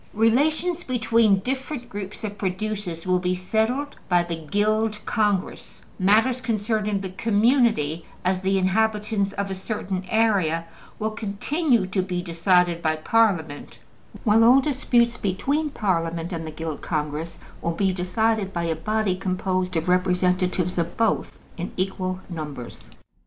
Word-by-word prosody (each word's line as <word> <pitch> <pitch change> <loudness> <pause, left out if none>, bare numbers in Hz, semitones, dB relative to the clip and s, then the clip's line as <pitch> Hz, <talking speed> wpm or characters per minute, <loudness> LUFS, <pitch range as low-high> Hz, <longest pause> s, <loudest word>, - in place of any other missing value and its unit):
Relations 305 - +2
between 230 - +3
different 260 +2 -4
groups 205 +1 -7
of 205 -1 -5
producers 190 -3 -3
will 185 0 +2
be 180 0 0
settled 220 +10 -1
by 175 -1 +4
the 170 -1 -4
Guild 215 +3 +1
Congress, 205 -4 -1 0.2
matters 225 +7 +3
concerning 215 -3 0
the 190 -2 -5
community 215 - +2 0.2
as 185 0 +1
the 195 +1 +1
inhabitants 210 +1 +1
of 200 -1 -3
a - - -1
certain 190 -1 -4
area 195 -8 +2 0.3
will 220 0 -2
continue 225 - 0
to 190 +1 0
be 180 -1 -3
decided 175 0 +2
by 155 -1 +1
Parliament, 160 -4 0 0.5
while 225 0 +5
all 250 +4 +7
disputes 250 -4 +1
between 280 +11 -1
Parliament 170 - -1
and 165 -1 -4
the - - -4
Guild 160 -1 -5
Congress 155 +1 -3 0.2
will - - -1
be 190 +1 +1
decided 195 +3 0
by 170 -2 -2
a 165 -1 0
body 215 +3 0
composed 185 -1 -1
of 160 - -2
representatives 180 0 +1
of 170 +1 -2
both 225 -1 0 0.2
in 175 0 -4
equal 185 0 -2
numbers. 150 -8 -7
195 Hz, 140 wpm, -24 LUFS, 180-220 Hz, 0.5 s, all